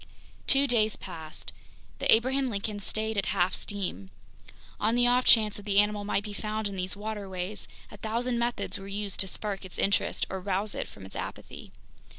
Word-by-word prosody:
Two 275 Hz, 0 st, +6 dB
days 220 Hz, -5 st, +2 dB
passed. 160 Hz, -1 st, -6 dB, 0.5 s
The -, -, +3 dB
Abraham 260 Hz, +3 st, +4 dB
Lincoln 205 Hz, -1 st, -3 dB
stayed 220 Hz, +1 st, -1 dB
at 195 Hz, -, -2 dB
half 185 Hz, -2 st, +2 dB
steam. 180 Hz, -, -4 dB, 0.7 s
On 220 Hz, +2 st, +2 dB
the 245 Hz, 0 st, +4 dB
offchance 240 Hz, -4 st, +5 dB
that 205 Hz, 0 st, -10 dB
the 200 Hz, -1 st, +2 dB
animal 210 Hz, 0 st, +2 dB
might 200 Hz, 0 st, +1 dB
be 210 Hz, -1 st, -6 dB
found 215 Hz, +1 st, -2 dB
in 200 Hz, -, -5 dB
these 185 Hz, 0 st, -2 dB
waterways, 205 Hz, -2 st, -3 dB, 0.2 s
a -, -, -10 dB
thousand 235 Hz, +2 st, -1 dB
methods 235 Hz, -3 st, -1 dB
were 195 Hz, -, -8 dB
used 200 Hz, 0 st, -2 dB
to 190 Hz, -, +2 dB
spark 200 Hz, 0 st, -2 dB
its 185 Hz, -, -2 dB
interest 200 Hz, -, +1 dB
or 190 Hz, 0 st, -4 dB
rouse 200 Hz, +2 st, 0 dB
it -, -, -3 dB
from 95 Hz, -, -12 dB
its 95 Hz, -, -7 dB
apathy. -, -, -7 dB
205 Hz, 180 wpm, -29 LUFS, 195-220 Hz, 0.7 s, Two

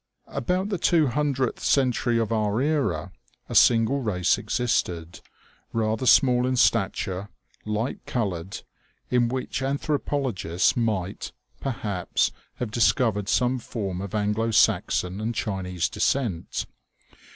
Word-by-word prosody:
About 185 Hz, -, -1 dB
the 195 Hz, -4 st, -2 dB
two 165 Hz, -2 st, +3 dB
hun 150 Hz, +4 st, 0 dB
dredth 130 Hz, -3 st, -1 dB
century 125 Hz, -3 st, +2 dB
of 115 Hz, -1 st, 0 dB
our 110 Hz, -1 st, +1 dB
era, 130 Hz, -, 0 dB, 0.4 s
a -, -, -6 dB
single 120 Hz, +4 st, +4 dB
race 95 Hz, -6 st, +1 dB
existed, 90 Hz, -9 st, -1 dB, 0.5 s
rather 110 Hz, +2 st, 0 dB
small 125 Hz, 0 st, +5 dB
in 130 Hz, -, 0 dB
stature, 100 Hz, -4 st, +1 dB, 0.4 s
light 105 Hz, +4 st, -2 dB
colored, 95 Hz, -6 st, -3 dB, 0.5 s
in 125 Hz, -1 st, +3 dB
which 130 Hz, +2 st, -3 dB
anthropologists 135 Hz, -, 0 dB
^oo -, -, -10 dB
OMEGA. 120 Hz, -, +2 dB
might, 100 Hz, -3 st, -3 dB, 0.3 s
perhaps, 105 Hz, -8 st, -1 dB, 0.2 s
have 120 Hz, -4 st, -4 dB
discovered 110 Hz, -3 st, +2 dB
some 125 Hz, +1 st, +2 dB
form 100 Hz, -6 st, -4 dB
of 100 Hz, +1 st, -5 dB
Anglo 105 Hz, +2 st, 0 dB
Saxon 100 Hz, -3 st, +2 dB
and 115 Hz, +2 st, -2 dB
Chinese 90 Hz, -5 st, -2 dB
descent. 110 Hz, -, -1 dB
115 Hz, 125 wpm, -25 LUFS, 100-130 Hz, 0.5 s, small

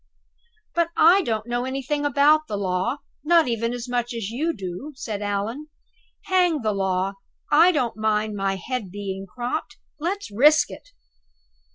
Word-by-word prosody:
"But 340 Hz, -1 st, +1 dB
I 350 Hz, +5 st, +7 dB
don't 220 Hz, -, -2 dB
know 240 Hz, 0 st, -1 dB
anything 275 Hz, +3 st, -2 dB
about 295 Hz, +2 st, +4 dB
the 205 Hz, -, -3 dB
law, 200 Hz, +8 st, -1 dB, 0.2 s
not 335 Hz, 0 st, +4 dB
even 230 Hz, -1 st, -1 dB
as 245 Hz, 0 st, -5 dB
much 245 Hz, -1 st, -2 dB
as 220 Hz, -2 st, -4 dB
you 305 Hz, +8 st, 0 dB
do," 195 Hz, -, -7 dB
said 220 Hz, -6 st, -5 dB
Allan. 205 Hz, +8 st, -3 dB, 0.6 s
"Hang 360 Hz, -, +2 dB
the 215 Hz, -1 st, +1 dB
law! 190 Hz, 0 st, 0 dB, 0.4 s
I 330 Hz, +5 st, +7 dB
don't 250 Hz, -9 st, -1 dB
mind 215 Hz, -1 st, 0 dB
my 195 Hz, -1 st, 0 dB
head 215 Hz, +2 st, -4 dB
being 195 Hz, 0 st, -5 dB
cropped. 245 Hz, +9 st, -4 dB, 0.2 s
Let's 370 Hz, -, -3 dB
risk 295 Hz, +9 st, +5 dB
it." -, -, -11 dB
240 Hz, 155 wpm, -24 LUFS, 205-300 Hz, 0.6 s, I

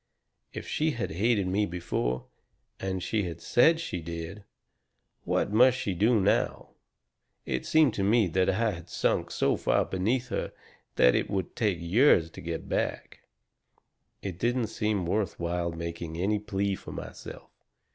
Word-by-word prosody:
If -, -, -7 dB
she 155 Hz, 0 st, 0 dB
had 115 Hz, -, -3 dB
hated 100 Hz, +4 st, +1 dB
me 100 Hz, +3 st, +1 dB
before 65 Hz, -8 st, -2 dB, 0.5 s
and 95 Hz, -1 st, -3 dB
she 110 Hz, -, 0 dB
had 85 Hz, -2 st, -6 dB
said 160 Hz, +7 st, +4 dB
she 90 Hz, -, -4 dB
did 85 Hz, +5 st, -6 dB, 0.8 s
what 105 Hz, -, 0 dB
must 125 Hz, +3 st, +6 dB
she 100 Hz, -6 st, -2 dB
do 110 Hz, +5 st, +3 dB
now? 100 Hz, +1 st, +1 dB, 0.8 s
It 65 Hz, -1 st, -3 dB
seemed 155 Hz, -6 st, +4 dB
to 100 Hz, -, -1 dB
me 110 Hz, +2 st, +4 dB
that 90 Hz, +2 st, +2 dB
I 110 Hz, +3 st, +1 dB
had 85 Hz, -2 st, -9 dB
sunk -, -, 0 dB
so -, -, +1 dB
far -, -, +1 dB
beneath 115 Hz, +7 st, -1 dB
her -, -, -3 dB, 0.4 s
that 60 Hz, -, +5 dB
it -, -, 0 dB
would 95 Hz, -3 st, -3 dB
take 105 Hz, -7 st, +1 dB
years 85 Hz, -, +4 dB
to -, -, -10 dB
get 85 Hz, -1 st, -5 dB
back. -, -, -2 dB, 1.0 s
It 95 Hz, -3 st, -5 dB
didn't 120 Hz, 0 st, +1 dB
seem 105 Hz, -4 st, 0 dB
worth 95 Hz, -1 st, -1 dB
while 85 Hz, 0 st, -1 dB
making 85 Hz, -1 st, -5 dB
any 100 Hz, +4 st, +1 dB
plea 100 Hz, -1 st, -1 dB
for -, -, -7 dB
myself. -, -, -9 dB
95 Hz, 155 wpm, -28 LUFS, 85-110 Hz, 1.0 s, must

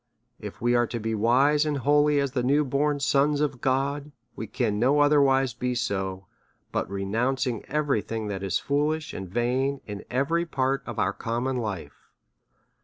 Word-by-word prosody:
If 105 Hz, -2 st, -8 dB
we 120 Hz, +1 st, +1 dB
are 120 Hz, -1 st, +3 dB
to 120 Hz, -, -4 dB
be 110 Hz, +1 st, -2 dB
wise 130 Hz, +7 st, +3 dB
and 150 Hz, -2 st, -1 dB
holy 145 Hz, +2 st, +3 dB
as 140 Hz, -2 st, 0 dB
the 130 Hz, -1 st, -1 dB
new 140 Hz, +4 st, +2 dB
born 145 Hz, +2 st, 0 dB
sons 145 Hz, +1 st, +2 dB
of 145 Hz, -4 st, -1 dB
God, 140 Hz, +2 st, -1 dB, 0.2 s
we 110 Hz, -, -6 dB
can 105 Hz, 0 st, -1 dB
no 135 Hz, +5 st, +3 dB
otherwise 135 Hz, -3 st, +4 dB
be 125 Hz, +1 st, -2 dB
so, 95 Hz, -5 st, -2 dB, 0.5 s
but -, -, -1 dB
by 100 Hz, -, -9 dB
re 100 Hz, 0 st, -3 dB
nouncing" 125 Hz, +3 st, -1 dB
every 145 Hz, -6 st, 0 dB
thing 110 Hz, 0 st, -4 dB
that 100 Hz, -2 st, -4 dB
is 95 Hz, -1 st, 0 dB
foolish 150 Hz, +2 st, -1 dB
and 95 Hz, -2 st, -6 dB
vain 125 Hz, +6 st, 0 dB
in 105 Hz, -1 st, -7 dB
every 165 Hz, +7 st, 0 dB
part 135 Hz, -2 st, 0 dB
of -, -, -6 dB
our -, -, +1 dB
common 120 Hz, +3 st, -2 dB
life. 100 Hz, -11 st, -6 dB
130 Hz, 180 wpm, -26 LUFS, 115-145 Hz, 0.5 s, otherwise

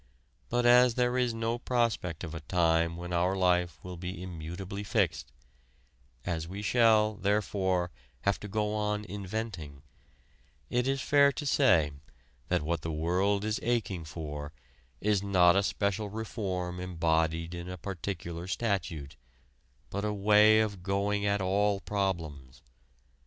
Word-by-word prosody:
But 120 Hz, 0 st, +1 dB
as 125 Hz, 0 st, +6 dB
there 125 Hz, 0 st, +1 dB
is 125 Hz, -1 st, +2 dB
no 115 Hz, +1 st, -2 dB
prospect 115 Hz, -10 st, -1 dB
of 80 Hz, -2 st, -6 dB
a 80 Hz, -, -5 dB
time 85 Hz, 0 st, +1 dB
when 90 Hz, 0 st, -6 dB
our 90 Hz, +2 st, +2 dB
life 90 Hz, -3 st, +2 dB
will 90 Hz, -1 st, -7 dB
be 90 Hz, +1 st, -6 dB
immutably 90 Hz, +3 st, -6 dB
fixed, 100 Hz, -, 0 dB, 0.9 s
as 80 Hz, -2 st, -2 dB
we 100 Hz, +4 st, -6 dB
shall, 110 Hz, -1 st, +4 dB
therefore, 95 Hz, -3 st, 0 dB, 0.3 s
have 100 Hz, -1 st, +1 dB
to 105 Hz, -, -7 dB
go 105 Hz, +1 st, -1 dB
on 105 Hz, 0 st, -1 dB
inventing, 95 Hz, -7 st, -5 dB, 0.9 s
it 125 Hz, +1 st, +1 dB
is 135 Hz, 0 st, 0 dB
fair 140 Hz, -1 st, +5 dB
to 145 Hz, -, -5 dB
say 95 Hz, -, +4 dB, 0.6 s
that -, -, +1 dB
what 85 Hz, 0 st, -1 dB
the 80 Hz, -, -3 dB
world 95 Hz, +6 st, +1 dB
is 110 Hz, 0 st, -1 dB
aching 110 Hz, -7 st, -1 dB
for 75 Hz, -1 st, -6 dB, 0.5 s
is 105 Hz, -2 st, +1 dB
not 90 Hz, -3 st, +4 dB
a 100 Hz, -, +4 dB
special 100 Hz, +1 st, -1 dB
reform 95 Hz, -5 st, -4 dB
embodied 80 Hz, -1 st, 0 dB
in 85 Hz, +1 st, -6 dB
a 90 Hz, -, -6 dB
particular 85 Hz, -1 st, -5 dB
statute, 85 Hz, -, -2 dB, 0.7 s
but 100 Hz, +1 st, -3 dB
a 105 Hz, -, 0 dB
way 105 Hz, +2 st, +5 dB
of 100 Hz, -4 st, -2 dB
going 100 Hz, +2 st, 0 dB
at 100 Hz, 0 st, +1 dB
all 100 Hz, +2 st, +2 dB
problems. 80 Hz, -11 st, -3 dB
95 Hz, 140 wpm, -30 LUFS, 85-105 Hz, 0.9 s, as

